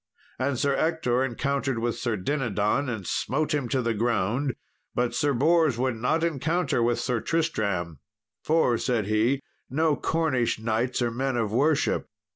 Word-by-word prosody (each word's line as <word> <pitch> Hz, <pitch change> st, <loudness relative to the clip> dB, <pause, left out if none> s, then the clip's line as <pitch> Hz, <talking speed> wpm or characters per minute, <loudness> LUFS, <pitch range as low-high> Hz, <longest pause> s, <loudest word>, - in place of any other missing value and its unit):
And 130 Hz, 0 st, 0 dB
Sir 140 Hz, +2 st, +1 dB
Ector 145 Hz, -7 st, +1 dB
encountered 135 Hz, +1 st, -1 dB
with 115 Hz, +1 st, -1 dB
Sir 120 Hz, -3 st, -1 dB
Dinadan 120 Hz, +2 st, 0 dB
and 110 Hz, -6 st, -4 dB
smote 150 Hz, -, -1 dB
him 140 Hz, -5 st, -1 dB
to 130 Hz, +1 st, 0 dB
the 115 Hz, 0 st, +1 dB
ground; 115 Hz, +4 st, 0 dB, 0.4 s
but 120 Hz, 0 st, 0 dB
Sir 145 Hz, -, +1 dB
Bors 155 Hz, 0 st, +3 dB
would 130 Hz, 0 st, 0 dB
not 140 Hz, +9 st, 0 dB
encounter 160 Hz, -2 st, 0 dB
with 120 Hz, +1 st, +1 dB
Sir 125 Hz, -3 st, 0 dB
Tristram, 100 Hz, -, -1 dB, 0.4 s
"For," 150 Hz, -7 st, +2 dB
said 120 Hz, -5 st, 0 dB
he, 110 Hz, +6 st, +1 dB, 0.3 s
"no 155 Hz, +3 st, +2 dB
Cornish 150 Hz, -8 st, 0 dB
knights 115 Hz, +3 st, -1 dB
are 120 Hz, -, 0 dB
men 130 Hz, +1 st, -1 dB
of 110 Hz, -3 st, 0 dB
worship." 140 Hz, +6 st, +1 dB
125 Hz, 155 wpm, -26 LUFS, 115-145 Hz, 0.4 s, Bors